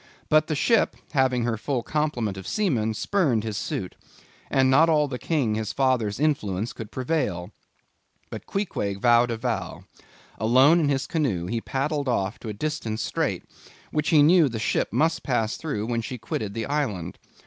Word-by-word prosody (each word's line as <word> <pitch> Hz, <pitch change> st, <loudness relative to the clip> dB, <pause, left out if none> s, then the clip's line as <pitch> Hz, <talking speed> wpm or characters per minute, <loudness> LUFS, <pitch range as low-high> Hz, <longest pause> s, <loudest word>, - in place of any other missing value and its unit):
But 155 Hz, 0 st, +4 dB
the 155 Hz, -, -1 dB
ship, 230 Hz, -, +2 dB, 0.2 s
having 130 Hz, -4 st, +2 dB
her 115 Hz, -1 st, -1 dB
full 125 Hz, +1 st, -2 dB
complement 135 Hz, -10 st, -1 dB
of 95 Hz, -1 st, -8 dB
seamen, 120 Hz, -, 0 dB
spurned 140 Hz, -, +1 dB
his 110 Hz, -2 st, -4 dB
suit; 95 Hz, -2 st, -4 dB, 0.5 s
and 135 Hz, -1 st, +3 dB
not 150 Hz, +5 st, +5 dB
all 150 Hz, -2 st, +3 dB
the 125 Hz, -2 st, -5 dB
King 140 Hz, -10 st, 0 dB
his 110 Hz, -1 st, -3 dB
father's 130 Hz, -6 st, +1 dB
influence 115 Hz, -8 st, 0 dB
could 110 Hz, -2 st, -8 dB
prevail. 115 Hz, -, -2 dB, 0.8 s
But -, -, -8 dB
Queequeg 105 Hz, -, -2 dB
vowed 120 Hz, +2 st, +4 dB
a 115 Hz, -, -2 dB
vow. 110 Hz, -, -3 dB, 0.6 s
Alone 130 Hz, +10 st, +5 dB
in 150 Hz, -4 st, +1 dB
his 135 Hz, -1 st, 0 dB
canoe, 125 Hz, -, -1 dB
he 115 Hz, +5 st, -2 dB
paddled 140 Hz, +2 st, -2 dB
off 105 Hz, -1 st, -1 dB
to 115 Hz, -, -7 dB
a -, -, -3 dB
distant 115 Hz, -3 st, -3 dB
strait, -, -, -1 dB, 0.5 s
which 150 Hz, -1 st, 0 dB
he 150 Hz, -3 st, +6 dB
knew 165 Hz, -1 st, +5 dB
the 115 Hz, -, -4 dB
ship 110 Hz, -, 0 dB
must 165 Hz, +1 st, +1 dB
pass 115 Hz, -4 st, 0 dB
through 135 Hz, -10 st, -3 dB
when 115 Hz, 0 st, -1 dB
she 125 Hz, +3 st, -6 dB
quitted 105 Hz, -2 st, -4 dB
the 115 Hz, -1 st, -2 dB
island. 110 Hz, -, -2 dB
125 Hz, 175 wpm, -25 LUFS, 110-150 Hz, 0.8 s, he